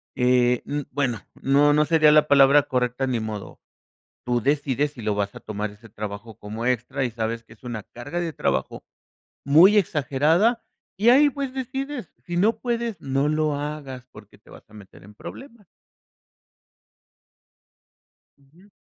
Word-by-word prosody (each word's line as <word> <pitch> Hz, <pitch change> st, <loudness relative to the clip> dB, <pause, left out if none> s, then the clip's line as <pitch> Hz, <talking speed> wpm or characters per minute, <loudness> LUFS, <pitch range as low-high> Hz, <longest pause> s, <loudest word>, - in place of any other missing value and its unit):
Eh, 125 Hz, -1 st, +3 dB
um, 145 Hz, 0 st, -3 dB
bueno, 125 Hz, -6 st, -1 dB, 0.2 s
no, 140 Hz, +2 st, +4 dB
no 150 Hz, +1 st, +3 dB
sería 155 Hz, -1 st, +5 dB
la 150 Hz, 0 st, +5 dB
palabra 140 Hz, 0 st, +6 dB
correcta 125 Hz, 0 st, -1 dB
ni 125 Hz, -3 st, -1 dB
modo. 110 Hz, -2 st, -7 dB, 0.6 s
Tú 120 Hz, -1 st, 0 dB
decides 140 Hz, +1 st, 0 dB
si 125 Hz, -, -11 dB
lo 105 Hz, -1 st, 0 dB
vas 100 Hz, -1 st, -2 dB
a -, -, -10 dB
tomar 105 Hz, 0 st, -4 dB
ese 105 Hz, +3 st, -16 dB
trabajo 105 Hz, +1 st, -7 dB
como 110 Hz, +3 st, -6 dB
extra, 125 Hz, +2 st, -1 dB
y 125 Hz, -, -1 dB
sabes 115 Hz, 0 st, -3 dB
que -, -, -18 dB
es 115 Hz, -, -20 dB
una 120 Hz, -3 st, -5 dB
carga 145 Hz, +9 st, -6 dB
de 170 Hz, -2 st, -3 dB
trabajo 65 Hz, -, -2 dB, 0.6 s
muy 170 Hz, +9 st, +6 dB
exagerada, 160 Hz, -, +2 dB, 0.3 s
y 215 Hz, +5 st, +4 dB
ahí, 285 Hz, +4 st, +6 dB
pues, 275 Hz, -2 st, -5 dB
decides. 265 Hz, -, -5 dB
Si 175 Hz, -, -3 dB
no 215 Hz, +4 st, +2 dB
puedes, 235 Hz, -3 st, -3 dB
no 135 Hz, +1 st, 0 dB
lo 155 Hz, -1 st, 0 dB
hagas, 145 Hz, -3 st, -6 dB
porque 105 Hz, -2 st, -15 dB
te 105 Hz, -, -24 dB
vas -, -, -15 dB
a -, -, -20 dB
meter 100 Hz, -4 st, -15 dB
en 105 Hz, +2 st, -15 dB
problemas. 235 Hz, -, -11 dB, 2.7 s
Ujú. 160 Hz, +9 st, -23 dB
140 Hz, 160 wpm, -24 LUFS, 115-165 Hz, 2.7 s, palabra